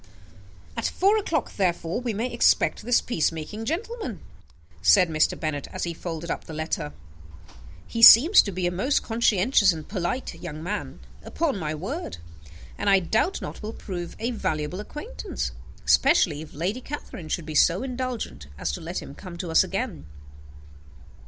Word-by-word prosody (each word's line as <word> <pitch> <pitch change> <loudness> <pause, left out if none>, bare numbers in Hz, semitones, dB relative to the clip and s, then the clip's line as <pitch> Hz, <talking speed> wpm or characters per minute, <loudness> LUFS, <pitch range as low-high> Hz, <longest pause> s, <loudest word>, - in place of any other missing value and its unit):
"At 230 - -1
four 395 +3 +3
o'clock, 320 - -2
therefore, 175 +1 0
we 245 -2 -2
may 230 +4 -3
expect 235 - +3
this 240 +2 +3
peace 170 -11 0
making 165 +8 -6
gentleman," 345 - -4 0.6
said 90 - +5
Mr. 155 -1 +1
Bennet, 145 -3 -3
as - - -5
he 170 - -2
folded 165 0 -5
up - - -4
the 160 - -8
letter. 155 - -3 0.9
"He 230 - -4
seems 255 - +10
to 200 - -4
be 185 -1 -2
a 175 - +1
most 205 +11 +1
conscientious 225 -2 +3
and 160 -2 -7
polite 195 +6 -3
young 155 -2 -6
man, 205 +4 -4 0.2
upon 320 -5 -1
my 155 -2 -2
word; 155 - -5 0.6
and, - - +1
I 195 - +7
doubt 220 - 0
not, - - -7
will 215 +1 -5
prove 175 -6 -6
a 235 +2 -2
valuable 155 -5 -2
acquaintance, 300 - -5 0.3
especially 190 - +4
if 160 - -10
Lady 190 - -2
Catherine 240 - -7
should 165 0 -2
be 155 - -6
so 170 - +4
indulgent 250 - -4
as 70 - -2
to 70 - -6
let - - -4
him - - -10
come 180 +2 -10
to 170 -1 -5
us 160 - +6
again." 75 - -4
190 Hz, 165 wpm, -25 LUFS, 160-240 Hz, 0.9 s, seems